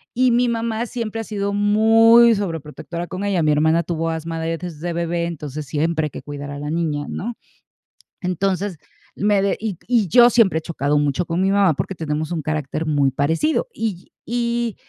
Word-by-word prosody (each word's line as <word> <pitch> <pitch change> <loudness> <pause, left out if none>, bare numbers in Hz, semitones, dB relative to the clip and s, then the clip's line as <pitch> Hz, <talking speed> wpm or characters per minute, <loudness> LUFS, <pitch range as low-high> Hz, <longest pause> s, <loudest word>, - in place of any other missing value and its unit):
y 255 +1 +4
mi 245 +1 +3
mamá 230 0 -1
siempre 225 -2 -4
ha - - -5
sido 200 -2 -3
muy 225 +3 +5
sobreprotectora 170 -2 -5
con 185 +3 -5
ella. 200 -4 +1
Mi 155 -1 +3
hermana 160 +3 +3
tuvo 165 -1 -2
asma 165 0 -4
de 165 0 -2
desde 170 -1 -5
bebé, 170 0 -1
entonces 150 -3 -5
siempre 155 +2 0
hay - - -3
que - - -8
cuidar 145 -1 -7
a 145 - -6
la 145 - -5
niña, 155 -3 -1
¿no? 235 +4 -4 0.9
Entonces, 185 0 -1 0.4
me 205 -1 +2
de 200 0 0
y 210 -6 -4
y 230 -7 +2
yo 240 +5 +7
siempre 215 -9 +3
he - - -12
chocado 150 -3 -1
mucho 145 +4 0
con 170 +2 -1
mi 190 - +2
mamá 195 -4 +4
porque 190 - -3
tenemos 155 0 -3
un 160 - -2
carácter 155 +1 -3
muy 145 -3 +2
parecido, 165 - 0
y 210 - -4
y 235 -1 -1
175 Hz, 190 wpm, -21 LUFS, 155-215 Hz, 0.9 s, yo